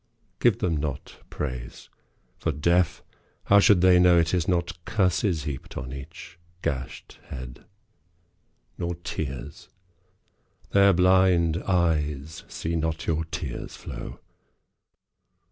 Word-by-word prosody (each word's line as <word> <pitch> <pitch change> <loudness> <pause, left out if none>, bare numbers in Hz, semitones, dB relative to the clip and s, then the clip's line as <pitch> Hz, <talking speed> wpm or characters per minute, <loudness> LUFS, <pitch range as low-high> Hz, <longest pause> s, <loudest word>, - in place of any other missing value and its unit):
Give 120 -5 +4
them 85 -4 0
not 70 -2 -5
praise. 65 -4 -6 0.5
For, 80 - 0
deaf, 85 +4 +1 0.4
how 100 - +6
should 100 -2 +5
they 90 -1 +6
know 90 -1 +6
It 85 +1 +2
is 90 -2 +1
not 85 -2 -1
curses 95 - +1
heaped 70 -3 -6
on 65 +1 -5
each 85 +5 -10 0.2
gashed 65 -2 -4
head? 65 -2 -9 1.1
Nor 85 0 -2
tears. 70 -6 -6 1.0
Their 100 0 +6
blind 90 -2 +4
eyes 80 -3 0
see 85 +1 -4
not 80 -1 -2
your 80 0 0
tears 80 - -6
flow. - - -8
85 Hz, 110 wpm, -26 LUFS, 75-90 Hz, 1.1 s, how